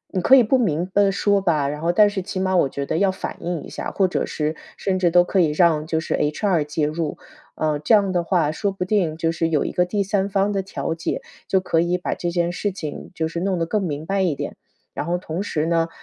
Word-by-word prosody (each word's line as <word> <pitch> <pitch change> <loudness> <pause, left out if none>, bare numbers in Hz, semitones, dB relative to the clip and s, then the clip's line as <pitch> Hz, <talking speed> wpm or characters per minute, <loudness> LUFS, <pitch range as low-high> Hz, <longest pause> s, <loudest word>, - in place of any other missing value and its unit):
你 185 - +1
可 265 +9 +7
以 250 - +6
不 245 +4 +3
明白 195 -1 +1
说 200 0 +2
吧， 155 -7 +1
然 150 +1 -4
后 170 +1 +2
但 210 +3 +5
是 200 -1 -3
起 190 0 -5
码 190 0 +1
我 170 -6 +3
觉 140 +1 -4
得， 160 - -1
要 195 +1 +3
反 190 - -5
映 170 -2 -3
一 - - -10
下， - - -5
或 195 - +2
者 180 - -1
是 155 +1 -2 0.2
甚 190 -1 -1
至 180 -2 +2
都 175 +1 +5
可 190 +1 +2
以 160 -3 +2
让 155 -1 +3
就 160 0 -1
是 160 - -2
HR 155 +3 +1
介 150 +1 -1
入。 155 +1 -3 0.4
嗯， 155 -2 -1
这 225 - +3
样 200 -2 +2
的 175 -1 +1
话， 165 -3 +1
说 200 +6 -1
不 190 -2 -4
定 180 -6 0
就 165 0 0
是 165 0 0
有 150 -3 +1
一 - - -2
个 180 - +3
第 200 +3 -1
三 195 0 0
方 200 +1 +1
的 195 - 0
调 190 -3 -4
解， 165 - -3 0.3
就 190 - +3
可 175 -3 0
以 175 +1 +1
把 180 - -2
这 175 - -3
件 170 0 0
事 205 +3 -2
情， 155 -6 -7
就 160 -3 -1
是 165 +1 -4
弄 190 0 0
得 165 - +1
更 210 +5 -1
明 155 -3 -3
白 195 +2 0
一 175 -6 +1
点。 - - -5 0.4
然 - - -3
后 175 +2 0
同 175 0 -4
时 155 -6 -1
呢， 165 0 +1
175 Hz, 290 characters per minute, -22 LUFS, 160-195 Hz, 0.4 s, 可